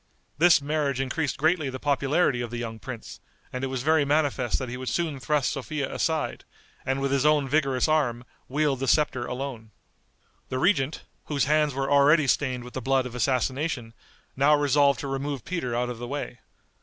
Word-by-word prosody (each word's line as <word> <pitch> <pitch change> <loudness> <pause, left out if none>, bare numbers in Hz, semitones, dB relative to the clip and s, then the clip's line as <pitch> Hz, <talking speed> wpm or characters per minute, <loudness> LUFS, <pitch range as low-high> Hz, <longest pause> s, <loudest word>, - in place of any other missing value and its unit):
This 170 -3 +6
marriage 145 -3 -1
increased 135 +1 -1
greatly 155 -1 +1
the 130 0 -6
popularity 140 -1 +1
of 120 - -4
the 120 - -5
young 115 -1 -5
prince, 115 0 -8 0.3
and 125 +1 -4
it - - 0
was 130 -1 -3
very 155 0 +3
manifest 140 -4 +1
that 130 - -4
he 120 - -5
would 130 0 -4
soon 160 -5 -1
thrust 145 +1 0
Sophia 140 0 -4
aside, 160 -2 -1 0.4
and 135 +1 -1
with 135 0 0
his 140 -1 +2
own 150 -2 +3
vigorous 135 -2 +1
arm, 135 -7 +1 0.2
wield 145 -1 0
the 135 - -2
scepter 130 -3 +2
alone. 125 -4 -5 0.8
The 130 - -2
regent, 145 -2 +1 0.2
whose 145 -2 0
hands 150 -1 +2
were 135 0 -1
already 145 +2 +5
stained 130 -2 0
with 125 - -11
the 130 - -4
blood 135 -1 +1
of 125 - -7
assassination, 130 0 -1 0.4
now 140 +3 +5
resolved 145 -2 +3
to 140 - -4
remove 135 0 -3
Peter 160 -10 -3
out 125 +1 -1
of 120 - -8
the 120 - -5
way. 140 -2 -5
135 Hz, 190 wpm, -26 LUFS, 125-150 Hz, 0.8 s, This